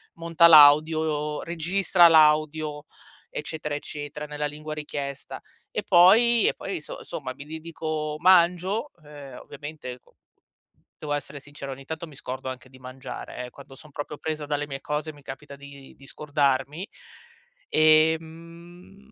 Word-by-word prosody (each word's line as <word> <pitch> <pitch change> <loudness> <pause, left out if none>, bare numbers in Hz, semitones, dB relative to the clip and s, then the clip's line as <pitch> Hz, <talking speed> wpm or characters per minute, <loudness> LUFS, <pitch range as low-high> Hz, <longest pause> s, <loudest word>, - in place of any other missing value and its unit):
monta 170 0 +4
l'audio, 150 0 +5
registra 175 +2 +3
l'audio, 155 -1 +3 0.4
eccetera, 150 -1 -5
eccetera, 145 0 -7
nella 150 0 -4
lingua 150 +1 -6
richiesta 145 -2 -6 0.3
e - - -2
poi 220 +6 +5
e - - +2
poi 190 -5 -6
so - - -9
somma 130 -3 -6
mi 140 - -11
dedico 155 -1 -5
mangio, 185 - +3
ehm, 145 -3 -11
ovviamente 145 -3 -9
co - - -29 0.8
devo 150 -1 -4
essere 145 0 -5
sincera, 145 -1 -9
ogni 135 +1 -9
tanto 160 +3 -6
mi 150 - -15
scordo 130 0 -6
anche 130 0 -8
di 130 0 -17
mangiare, 130 0 -8
eh. 125 - -10
Quando 135 +1 -14
sono 150 +2 -15
proprio 145 +1 -6
presa 155 -1 -4
dalle 145 0 -2
mie 135 -1 -7
cose, 150 +1 -4
mi 145 - -17
capita 140 +1 -10
di 140 -1 -13
di 135 - -17
scordarmi. 145 +4 -1 0.8
Ehm, 165 +5 0
150 Hz, 140 wpm, -25 LUFS, 145-165 Hz, 0.8 s, l'audio